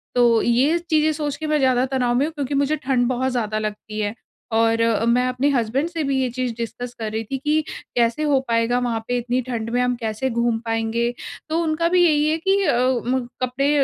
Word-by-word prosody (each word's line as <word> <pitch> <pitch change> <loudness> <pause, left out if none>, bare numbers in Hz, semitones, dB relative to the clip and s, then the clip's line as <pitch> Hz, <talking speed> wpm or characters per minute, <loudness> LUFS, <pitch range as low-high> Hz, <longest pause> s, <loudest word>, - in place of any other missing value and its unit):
तो 235 -2 +4
ये 260 +8 +3
चीज़ें 310 -1 +3
सोच 295 -2 -3
के 315 - -4
मैं 305 0 +2
ज़्यादा 260 -1 +3
तनाव़ 255 -2 0
में 275 - +2
हूँ, 320 - -4
क्योंकि 285 -2 -3
मुझे 285 +2 +2
ठंड 260 -4 0
बहुत 255 +1 0
ज़्यादा 215 -3 -1
लगती 215 0 -5
है 205 0 -1 0.4
और 225 0 +2
अ, 230 -1 +2
मैं 245 +2 +3
अपने 255 +3 +1
हसबैंड 260 +4 0
से 335 -2 -3
भी 275 -1 0
ये 255 - 0
चीज़ 255 -1 -2
डिस्कस 240 +1 -5
कर 215 -1 -3
रही 220 +1 -2
थी 270 - 0
कि 300 +3 +1 0.3
कैसे 235 +5 +1
हो 285 -3 +3
पाएगा 230 +1 +1
वहाँ 235 -2 -1
पे 245 0 0
इतनी 245 +1 -1
ठंड 230 -2 -3
में 245 +1 +1
हम 250 0 +1
कैसे 230 +2 -2
घूम 235 -1 0
पाएँगे? 225 +1 -1 0.4
तो 330 +2 +1
उनका 325 +1 +1
भी 360 0 +4
यहीं 300 -2 +3
है 320 - +1
कि 395 +1 +4
अ, 240 - +2 0.3
म 260 +1 +1 0.2
कपड़े 275 +4 +1
250 Hz, 225 wpm, -22 LUFS, 230-285 Hz, 0.4 s, तो